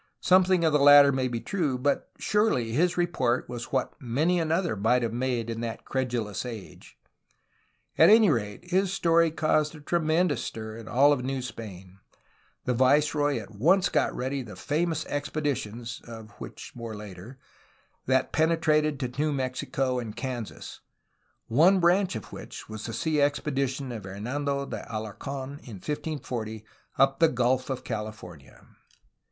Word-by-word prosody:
Something 185 -1 +4
of 160 - +2
the 150 - +4
latter 145 0 +8
may 130 -1 0
be 120 -2 -3
true, 155 - -1
but, 140 +2 0
surely, 210 - +1
his 175 +9 +1
report 130 -9 0
was 120 -1 -7
what 130 -1 0
many 150 +9 +1
another 165 - 0
might 115 +5 +2
have 115 -1 -2
made 120 -2 -1
in 115 0 -4
that 115 -1 -5
credulous 120 -6 -2
age. 115 -5 -9 1.0
At - - +8
any 215 -4 +7
rate, 115 - -3
his 190 +1 +2
story 165 -3 +3
caused 155 -1 +1
a - - -11
tremendous 160 -1 +1
stir 110 -1 -6
in 115 -1 -10
all 140 +5 +5
New 130 +1 -3
Spain. 95 -6 -9 0.7
The 125 - +1
viceroy 145 +3 +3
at 110 -3 -7
once 175 - +3
got - - +1
ready 130 +2 -2
the 110 -6 -9
famous 160 - -1
expeditions 125 -6 -3
(of 110 -2 -10
which, - - -9
later) 110 0 -8 0.7
that 130 0 +2
penetrated 155 -2 +2
to 125 +2 -3
New 155 0 +1
Mexico 130 -1 -1
and 110 -3 -6
Kansas, 120 -2 -6 0.7
one 170 +11 +4
branch 180 -1 +3
of 110 - -7
which - - -9
was 110 +1 -7
the 115 - -5
sea 155 +1 0
expedition 140 -2 -1
of 110 -5 -7
Hernando 140 +8 -3
de - - -5
Alarc6n, 115 +5 -5
in 115 - -10
1540, 120 - -5 0.3
up 135 0 +3
the 165 - +6
Gulf 125 +1 +1
of 130 -2 -3
California. 105 - -7
130 Hz, 150 wpm, -27 LUFS, 115-155 Hz, 1.0 s, latter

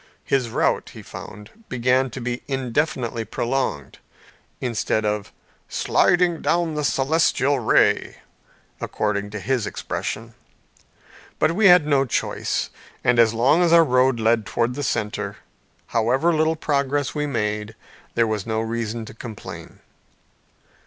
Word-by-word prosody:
His 130 -4 0
route, - - 0
he - - -9
found, 105 0 -10 0.2
began 125 +2 +2
to 130 - -7
be 120 0 -3
indefinitely 130 -3 -1
prolonged, 115 - -2 0.6
instead 110 -3 -1
of 105 -1 -2 0.4
"sliding 175 -2 +2
down 170 -2 +1
the 150 0 -2
celestial 140 -1 +2
ray," 115 - +2 0.6
according 105 -1 -2
to 105 0 -6
his 120 -1 -1
expression. 115 +2 -4 1.0
But - - +2
we 195 +4 +4
had 180 -4 +7
no 140 -2 +3
choice; 120 - -2 0.3
and 125 -2 +3
as 115 -1 +5
long 135 +9 +4
as 175 -2 +3
our 170 0 +8
road 125 -2 +3
led 110 0 +2
towards 120 +1 0
the 145 - -4
centre 105 -5 -2 0.5
however 130 +9 +1
little 160 +1 +2
progress 145 -3 0
we 150 -1 -1
made, 105 -4 -2 0.4
there 115 - +3
was 110 -1 -2
no 110 0 0
reason 115 0 -3
to - - -10
complain. 115 -1 -9
125 Hz, 130 wpm, -23 LUFS, 110-145 Hz, 1.0 s, our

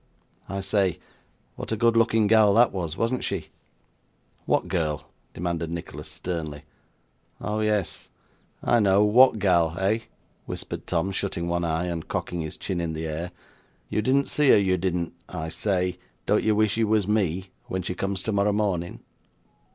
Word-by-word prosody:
I 100 0 -3
say, 95 -3 +1 0.6
what - - -6
a 110 - 0
good 115 +1 +3
looking 115 -1 +4
gal 105 -1 +5
that 120 +1 +6
was, 85 -5 -4
wasn't 120 +2 0
she?' 90 -6 -3 1.0
'What - - +2
girl?' 75 -5 -1 0.3
demanded 85 -1 -2
Nicholas, 85 0 -6
sternly. 80 -5 -5 0.8
'Oh 105 +1 -2
yes. 105 -7 -1 0.5
I 120 - +4
know 100 -1 +4
what 115 +3 +6
gal, 85 -4 +2
eh?' 100 +4 +1 0.5
whispered - - -5
Tom, 90 +3 0
shutting 95 -3 -2
one 85 0 0
eye, 80 +1 0
and 85 -2 -4
cocking 90 -1 -3
his 80 -1 -6
chin 90 -3 -3
in 80 -1 -2
the 80 +1 -4
air. 80 +3 -3 0.6
'You 105 - 0
didn't 135 +5 +2
see 150 -2 +3
her, - - +8
you 95 -2 +3
didn't 90 -1 -1 0.2
I 80 -3 -4
say, 90 -1 -1 0.3
don't - - +3
you 110 -1 +3
wish 110 0 +2
you 115 -1 +2
was 105 -2 +2
me, 95 -3 0 0.2
when 95 0 -3
she 90 - -2
comes 95 +1 -2
tomorrow 105 -1 +1
morning? 95 -5 -1
95 Hz, 165 wpm, -25 LUFS, 85-105 Hz, 1.0 s, her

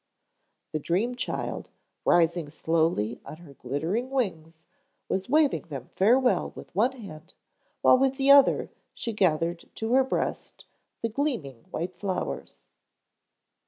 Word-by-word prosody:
The 155 - -2
dream 195 +11 0
child, 250 - -4 0.4
rising 170 -2 +3
slowly 160 -7 0
on 155 - -9
her 165 -4 -14
glittering 160 - -2
wings, 165 -11 -3 0.4
was 190 +2 -2
waving 300 - +2
them 135 -5 -8
farewell 250 +6 +3
with - - -11
one 230 +8 +2
hand, 180 -9 -11 0.5
while 255 - +6
with 270 0 +2
the 275 +1 +4
other 280 -1 +5 0.2
she 230 - -4
gathered 170 -3 +1
to 225 +2 -2
her 265 +1 +6
breast 260 - -3 0.4
the 230 - +1
gleaming 215 - -3
white 175 +3 -5
flowers. 190 -3 -4
185 Hz, 125 wpm, -27 LUFS, 160-250 Hz, 0.5 s, while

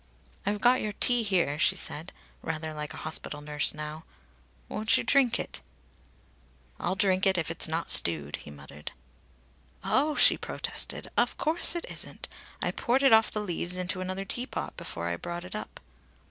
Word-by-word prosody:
"I've 205 0 0
got 250 +1 +5
your 210 -1 -2
tea 245 +3 +4
here," 175 -8 +1
she 190 - +4
said, 165 -2 -5 0.3
rather 160 -1 -3
like 150 -1 -5
a - - -8
hospital 155 -1 -4
nurse 150 0 -1
now. 150 +1 -6 0.6
"Won't 215 +1 +2
you - - 0
drink 270 -4 +4
it?" - - -3 1.2
"I'll 175 +3 0
drink 190 0 +3
it 190 -1 +4
if 165 -1 0
it's 165 - +2
not 160 +1 -2
stewed," 75 -4 0
he - - -11
muttered. 70 +1 -10 0.9
"Oh!" 295 +3 +2
she - - +6
protested. - - -3
"Of - - +2
course 330 +2 +3
it 345 - -3
isn't! - - -6 0.4
I - - +1
poured 255 +3 +1
it 270 - +7
off 220 0 +7
the 210 - -2
leaves 180 -2 -2
into 185 +1 -2
another 185 +1 -3
teapot 245 +6 -3
before 85 0 -4
I 85 0 -1
brought 175 - -5
it 180 - -8
up." 215 - -6
180 Hz, 175 wpm, -29 LUFS, 150-215 Hz, 1.2 s, it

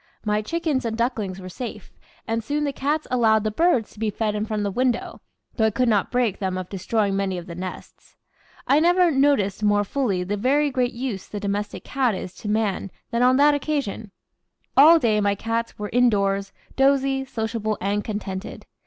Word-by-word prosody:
My 210 0 +1
chickens 310 +2 -1
and 225 -1 -3
ducklings 220 -6 -2
were 185 - -8
safe, 240 +6 -7 0.4
and 225 0 -1
soon 295 +5 -1
the 285 -1 -1
cats 295 +3 -1
allowed 220 -4 +3
the 215 - -1
birds 260 -4 +2
to - - -16
be 220 -1 0
fed 210 +1 -1
in 210 +1 -2
front 215 -1 -2
of - - -1
the 200 - -1
window, 245 +3 -1 0.4
though 220 -2 +4
I - - +3
could 250 +4 0
not 210 -4 +2
break 245 -5 0
them 190 -2 -2
of 185 -1 -5
destroying 200 +1 -1
many 195 -2 -1
of 175 - -7
the 175 - -8
nests. 180 +1 -9 0.5
I 285 - +4
never 350 +1 +4
NOTICED 270 -9 +2
more 205 -1 +3
fully 205 -5 -1
the 205 +3 -2
very 280 +6 +2
great 250 -1 0
use 235 -6 -4
the 205 - -6
domestic 205 +1 -3
cat 255 -6 0
is 185 -1 -6
to 210 - -6
man 210 -2 0 0.2
than 235 0 0
on 255 +1 +5
that 290 +1 +5
occasion. 280 -7 -2 0.7
All 315 +5 +8
day 220 -8 +2
my 200 0 +2
cats 230 +2 -3
were 210 -1 -5
indoors, 200 -5 +2 0.2
dozy, 270 0 +2
sociable, 220 -3 -3
and 200 +2 -1
contented. 205 -2 -5
220 Hz, 195 wpm, -23 LUFS, 205-260 Hz, 0.7 s, All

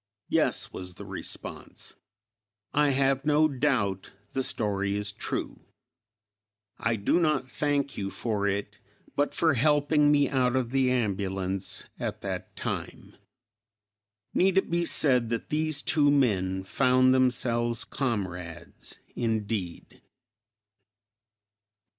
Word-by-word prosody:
"Yes," - - +1
was 90 -1 -7
the - - -9
response, - - -7 0.8
"I 150 0 +4
have 135 0 +2
no 150 +1 +4
doubt 125 -9 0 0.2
the 135 - 0
story 100 -5 -1
is 105 0 -2
true. - - -4 1.2
I 115 0 +1
do 105 - +2
not 150 -6 +1
thank 145 -2 0
you 95 -1 -2
for 105 -1 -1
it, 100 0 -3 0.4
but 145 +1 0
for 160 -2 +3
helping 145 +2 +3
me 145 -1 +4
out 130 -2 +1
of 125 -2 0
the 135 -1 +2
ambulance 95 -5 -2 0.2
at - - -4
that - - -5
time." - - -5 1.2
Need 190 +1 +3
it 190 - +2
be 170 0 +1
said 125 -8 +3
that 115 -1 -3
these 155 -1 0
two 145 -2 +3
men 95 -9 +2
found 130 +4 +3
themselves 120 -2 +1
comrades, 90 - -4 0.2
indeed? 110 -6 -3
125 Hz, 115 wpm, -28 LUFS, 100-145 Hz, 1.2 s, I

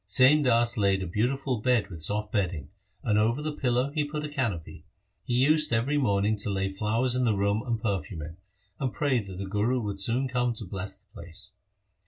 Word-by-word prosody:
Sain 130 +9 +5
Das 120 -3 +3
laid 100 -2 +2
a - - -3
beautiful 125 - -1
bed 120 -3 +1
with 80 -2 -8
soft 105 +5 -1
bedding, 90 -9 -1 0.3
and 105 -1 +2
over 115 +5 +2
the 155 +1 -2
pillow 130 -1 0
he 150 0 0
put 150 +1 -4
a - - -5
canopy. 110 - -3 0.4
He 120 - -1
used 155 -1 +3
every 125 +6 +1
morning 105 -4 +2
to 105 - 0
lay 95 -1 -1
flowers 110 +6 0
in 125 - +1
the 115 -4 +2
room 100 +2 +1
and 120 -3 -2
perfume 95 -7 -3
it, 80 +2 -8 0.4
and 130 -2 -1
pray 140 -4 +1
that 95 -4 -7
the 100 - -4
Guru 105 +6 0
would 100 -3 -4
soon 120 +6 +2
come 125 -2 0
to 110 - -6
bless 95 +1 -6
the 100 - -28
place. 95 0 -9
110 Hz, 210 wpm, -27 LUFS, 100-130 Hz, 0.4 s, Sain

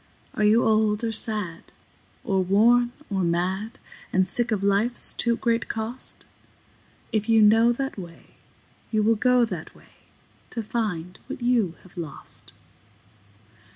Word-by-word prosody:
Are 215 - -1
you 215 +3 +5
old 215 0 +2
or 230 - 0
sad 210 -6 -4 0.5
or 190 -1 +1
worn 235 +6 +4 0.2
or 195 -1 0
mad, 185 +5 -1 0.3
And 185 0 +2
sick 240 +5 0
of 205 -3 0
life's 205 +5 +1
too 235 -1 +1
great 230 -1 0
cost? 225 +3 -4 0.9
If 215 0 -1
you 225 0 +5
know 225 +3 +6
that 270 -3 -4
way, 170 -2 -12 0.5
you 215 -1 +1
will 225 +2 +4
go 250 +2 +3
that 230 - -7
way, - - -21 0.5
To 230 - -4
find 190 -6 -3
what 245 - -7
you 230 -8 +2
have 185 0 -19
lost. 160 -5 -2
215 Hz, 140 wpm, -25 LUFS, 190-235 Hz, 0.9 s, know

